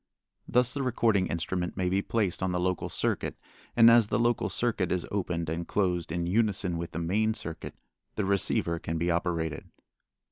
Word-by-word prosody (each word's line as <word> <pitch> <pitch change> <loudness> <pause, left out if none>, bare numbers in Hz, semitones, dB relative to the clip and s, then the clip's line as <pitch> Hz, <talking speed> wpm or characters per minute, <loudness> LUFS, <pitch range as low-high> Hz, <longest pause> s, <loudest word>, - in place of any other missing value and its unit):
Thus 125 0 +2
the 140 - -2
recording 115 -6 +2
instrument 90 +2 -3
may 90 -1 0
be 95 +2 +1
placed 100 -5 -1
on 95 -1 0
the 90 - -1
local 90 0 -1
circuit - - -1 0.4
and 115 -1 +7
as 115 -2 +6
the - - 0
local 120 0 +1
circuit 110 -7 0
an 90 -1 0
opened 85 -4 -2
and 80 +2 -3
closed 90 -5 0
in 85 +1 -1
unison 95 -3 +1
with 85 - -4
the - - -4
main 105 +6 +1
circuit, 80 -6 -6 0.4
the 105 - -1
receiver 95 -3 +1
can 80 0 -3
be 85 +2 0
operated. 85 -3 -2
90 Hz, 180 wpm, -28 LUFS, 85-110 Hz, 0.4 s, and